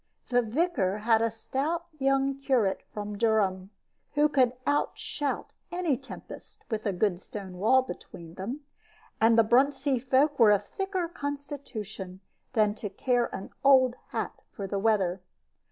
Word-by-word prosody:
The 245 0 +4
vicar 230 - 0
had 225 -1 +5
a 230 - +2
stout 280 +9 -2
young 275 0 +2
curate 245 -8 +1
from 205 -1 -5
Durham, 200 -5 +1 0.5
who 295 +1 +4
could 255 -4 +3
outshout 290 0 -1 0.2
any 350 -5 +1
tempest, - - -11
with 220 0 -1
a - - +2
good 185 -1 0
stone 190 -4 -8
wall 260 +6 +5
between 170 -6 -9
them; 230 - -5 0.6
and 225 +1 +5
the 225 - +7
Bruntsea 265 +3 +3
folk 270 +3 +2
were 225 -3 +8
of 205 0 +3
thicker 385 - -2
constitution 275 - -6 0.3
than 210 -2 +3
to 210 -1 -5
care 245 +4 +1
an 190 - -7
old 260 -3 +6 0.2
hat - - -3 0.2
for 200 - -6
the 195 +1 -2
weather. 195 -4 +1
235 Hz, 145 wpm, -28 LUFS, 205-275 Hz, 0.6 s, were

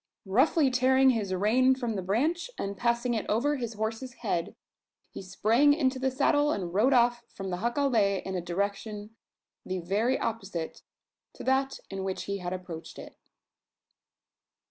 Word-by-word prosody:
Roughly 260 - +3
tearing 260 +1 +4
his 210 -5 -2
rein 235 +8 +3
from 240 -4 -3
the 195 - -2
branch, 295 - 0
and 200 0 -3
passing 235 +3 0
it 220 - -1
over 285 +7 +1
his 235 -3 -4
horse's 225 +4 -4
head, 170 -5 -1 0.6
he - - -7
sprang 225 +10 +3
into 265 -4 0
the 265 0 +1
saddle, 290 +3 +2
and 180 - -3
rode 220 +8 +3
off 240 -1 +3
from 195 -1 -5
the 180 - -2
jacale 230 -3 +1
in 190 - -4
a 180 - -2
direction 200 +4 -3 0.5
the 185 - -3
very 210 +9 0
opposite 195 -8 -4 0.5
to - - -10
that 270 +1 +1
in 195 -1 -4
which 190 -1 -3
he 200 0 -3
had 175 -1 -4
approached 180 -3 -7
it. - - -10
225 Hz, 160 wpm, -28 LUFS, 195-260 Hz, 0.6 s, tearing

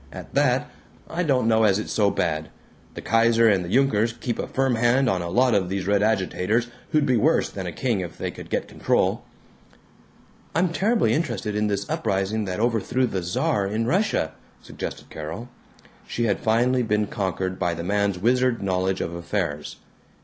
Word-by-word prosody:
At - - -10
that, - - +2 0.4
I 175 - -3
don't 135 -8 +2
know 110 -1 +4
as 100 -3 +4
it's 110 - -4
so 105 -2 +3
bad. 80 -4 -1 0.5
The - - -7
Kaiser 115 0 +4
and 100 -4 +3
the 85 - -6
Junkers 115 -1 +2
keep 120 0 -4
a - - -2
firm 135 -1 +1
hand 120 +3 +3
on 95 -6 +1
a 85 - -4
lot 125 +6 +3
of 95 -4 +1
these 95 -1 -2
red 100 0 +2
agitators 110 +2 +1 0.2
who'd 150 -2 +2
be 125 -3 +3
worse - - +2
than - - -5
a - - -3
king 120 -6 -1
if 90 -3 -6
they - - -3
could - - -11
get - - -1
control." - - 0 1.3
"I'm 180 +2 +3
terribly 215 +7 +2
interested 115 - -2
in 105 0 +1
this 100 -1 -2
uprising 100 +3 -1
that 95 +1 -3
overthrew 120 +2 +1
the 95 -6 -2
Czar 95 +3 0
in 110 +3 -1
Russia," 170 - +1 0.3
suggested - - -7
Carol. 80 +11 -6 0.6
She 120 - -2
had 100 -4 +1
finally 120 +3 +2
been 105 -2 +1
conquered 95 -2 -3
by 85 -1 0
the 85 - -5
man's 100 0 0
wizard 125 +3 +1
knowledge 95 0 0
of 85 - -3
affairs. 85 -4 -3
105 Hz, 185 wpm, -24 LUFS, 95-120 Hz, 1.3 s, know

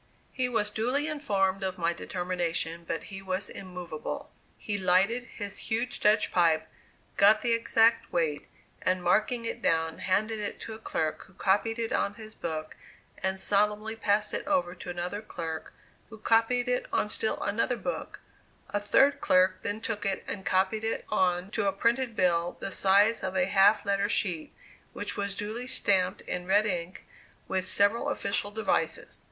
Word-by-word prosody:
He 255 -1 -1
was 215 -3 0
duly 250 +8 0
informed 195 -11 0
of 190 -1 -2
my 170 -1 +1
determination, 170 -2 -3
but 165 - -3
he 195 - -6
was 185 0 -3
immovable. 180 -4 -6 0.3
He 210 - -3
lighted 195 +6 +2
his 205 -3 -4
huge 230 +3 -1
Dutch 210 +1 +3
pipe, 160 -3 +3 0.5
got 210 +2 +6
the 240 - +1
exact 230 0 +3
weight, 160 -4 -1 0.3
and 185 -1 0
marking 230 +4 +2
it - - -4
down, 160 -1 +1
handed 215 +4 0
it 205 - -4
to 225 - -6
a 220 - -9
clerk, 160 -7 -2
who 185 - -21
copied 205 +4 +1
it 230 -1 -2
on 200 - 0
his 220 -1 -10
book, 155 -4 -5 0.5
and 190 0 0
solemnly 210 +2 +1
passed 210 -1 0
it - - -3
over 275 -12 +1
to 180 - -9
another 175 +4 -3
clerk, 165 -5 -6 0.4
who 220 - -10
copied 230 +3 +2
it 250 0 0
on - - +1
still 220 +1 0
another 230 +4 0
book; - - -5 0.5
a 205 - 0
third 270 +7 +3
clerk 185 +1 +3
then 205 +1 -3
took 220 -2 -3
it, 195 -1 -1
and 190 -1 -4
copied 190 +4 +1
it 225 - -2
on 185 -1 +1
to 200 - 0
a - - +3
printed 235 +4 0
bill, 175 -2 +1
the 195 - -4
size 200 +4 +4
of 190 0 -3
a 185 -1 +3
half 200 +2 +4
letter 200 +1 +1
sheet, 170 -6 0 0.4
which - - -3
was 200 0 -2
duly 220 +5 -4
stamped 195 -7 +1
in 180 0 -5
red 205 +3 +4
ink 180 -2 -3 0.4
with 185 -1 -1
several 205 +8 +2
official 205 -6 -1
devices. 220 +1 -1
200 Hz, 170 wpm, -29 LUFS, 185-220 Hz, 0.5 s, got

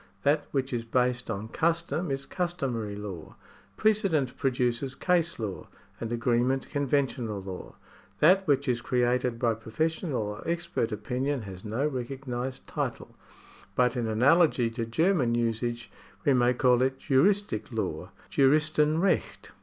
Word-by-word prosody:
That 145 +1 +2
which 135 -1 -1
is 120 -1 -1
based 125 +1 0
on 110 0 -4
custom 170 +3 0
is 135 0 -3
customary 135 - -2
law. 100 -6 -7 0.4
Precedent 195 - +2
produces 130 0 0
case 170 -2 +1
law, 105 -5 -5 0.3
and 115 0 -4
agreement 120 +2 +1
conventional 135 -6 0
law. 95 -1 -8 0.4
That 190 +4 +5
which 140 -1 +2
is 120 -2 +1
created 125 0 +1
by 115 -1 +2
professional 140 - -2
or 105 +1 -5
expert 170 -8 -1
opinion 125 +5 -2
has 95 -2 -8
no 115 +7 -1
recognised 130 -1 -4
title, - - -4 0.6
but 125 -1 +3
in 120 -2 -1
analogy 125 +2 +4
to 115 -1 -3
German 150 -2 +2
usage 120 0 -2 0.3
we 140 - +5
may 125 0 +3
call 125 0 +4
it 130 +1 +1
juristic 145 - +1
law - - -3 0.2
(Juristenrecht). 155 +5 +2
125 Hz, 130 wpm, -28 LUFS, 115-150 Hz, 0.6 s, That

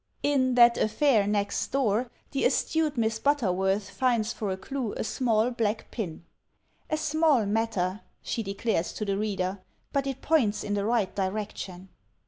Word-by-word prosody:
In 260 -3 +2
"That 235 -1 +6
Affair 215 -2 +3
Next 205 -1 0
Door," 245 -3 +1 0.2
the 275 - -1
astute 315 -4 +1
Miss 225 -1 0
Butterworth 200 -7 +1
finds 230 +1 +1
for 210 - -3
a 190 - -2
clue 255 +2 -4
a - - -3
small 230 0 +1
black 220 -2 -2
pin: 175 -7 -5 0.6
"A 310 - 0
small 310 -6 +2
matter," 205 -3 -1 0.2
she 230 - -2
declares 200 -3 -1
to 215 - -4
the 200 -1 0
reader, 195 -2 -2 0.3
"but 275 -1 0
it 270 -1 -4
points 260 -10 +2
in 205 - -2
the 200 -1 0
right 225 -4 +1
direction." 190 -2 -4
220 Hz, 155 wpm, -27 LUFS, 200-255 Hz, 0.6 s, That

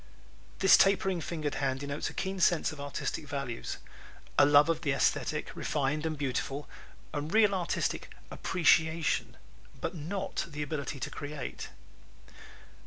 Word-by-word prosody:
This 190 - +7
tapering 190 -2 +3
fingered 155 -3 -3
hand 135 -1 0
denotes 140 0 -3
a - - -12
keen 190 0 -2
sense 175 -1 +3
of 155 -2 -8
artistic 145 +2 -4
values; 140 -4 -4 0.6
a - - +6
love 145 +1 +7
of 165 -1 0
the 145 -4 +1
esthetic, 135 - 0
refined 150 +2 -1
and 155 -1 -3
beautiful; 140 +1 -2 0.5
and 150 +1 -3
real 215 -2 +5
artistic 180 -3 -1 0.2
appreciation, 160 -2 +2 0.4
but 165 - -3
not 185 +4 -3
the 150 -1 -4
ability 145 -2 -4
to - - -3
create. 145 -2 -6
150 Hz, 135 wpm, -30 LUFS, 145-170 Hz, 0.6 s, This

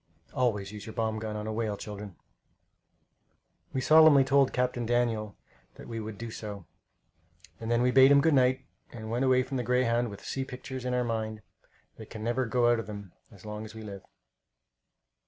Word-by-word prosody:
Always 105 -6 0
use 105 +1 -9
your 110 - -7
bomb 110 -2 -1
gun 110 -1 -5
on 105 0 -4
a 110 - -3
whale, 110 -2 -2
children. 105 -3 -8 1.6
We 130 - -2
solemnly 155 -1 +7
told 135 0 +3
Captain 125 -1 -1
Daniel 115 -3 0 0.4
that - - -12
we 115 -1 -5
would 110 -1 -6
do 115 +1 -6
so, 105 -5 -7 0.9
and 115 - -5
then 120 +1 +2
we 125 - +3
bade 135 +1 +7
him 140 0 +7
good 160 +2 +3
night 130 -1 +3 0.3
and 110 -2 -7
went 120 +3 0
away 130 -1 +4
from 135 +1 -4
the 125 - -1
Greyhound 120 -1 +1
with 100 - -10
sea 135 - -2
pictures 130 0 -7
in 125 0 0
our 125 - +1
minds 110 -2 -3 0.6
that 110 - -11
can 110 -2 -8
never 120 +2 0
go 120 0 +3
out 120 - +2
of 115 - -6
them 100 -3 -8 0.2
as 100 -2 -16
long 105 0 -6
as 110 0 -10
we 110 - -8
live. 100 -2 -8
115 Hz, 195 wpm, -29 LUFS, 110-125 Hz, 1.6 s, solemnly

